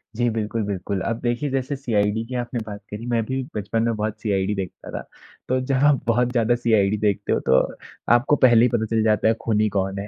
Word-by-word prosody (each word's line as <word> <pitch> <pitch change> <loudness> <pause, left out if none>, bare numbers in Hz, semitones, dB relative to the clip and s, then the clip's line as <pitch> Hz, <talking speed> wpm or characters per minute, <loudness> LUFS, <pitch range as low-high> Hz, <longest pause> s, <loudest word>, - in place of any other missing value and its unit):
जी 120 +1 +1
बिल्कुल, 110 0 -2
बिल्कुल। 100 -1 -3
अब 115 +4 -2
देखिए 120 +4 -1
जैसे 135 +1 -2
सीआईडी 110 -5 0
की 125 +2 -7
आपने 120 0 -3
बात 105 -1 -7
करी 105 +3 -7
मैं 115 -1 +2
भी 130 +3 -2
बचपन 110 +2 -1
में 115 -1 0
बहुत 110 +1 -3
सीआईडी 100 -1 0
देखता 95 -2 -6
था। - - -4 0.5
तो 130 +1 +1
जब 135 - +2
आप 145 -3 +4
बहुत 120 +1 +2
ज़्यादा 120 -1 +2
सीआईडी 110 -4 +2
देखते 105 -2 0
हो - - +1
तो 65 - +5 0.5
आपको 130 +5 +3
पहले 120 -3 +5
ही - - +2
पता 110 -2 +1
चल 115 -1 +2
जाता 110 0 +2
है 110 - +4
खूनी 110 -1 +1
कौन 95 0 -2
है। 100 - -5
110 Hz, 225 wpm, -23 LUFS, 105-120 Hz, 0.5 s, तो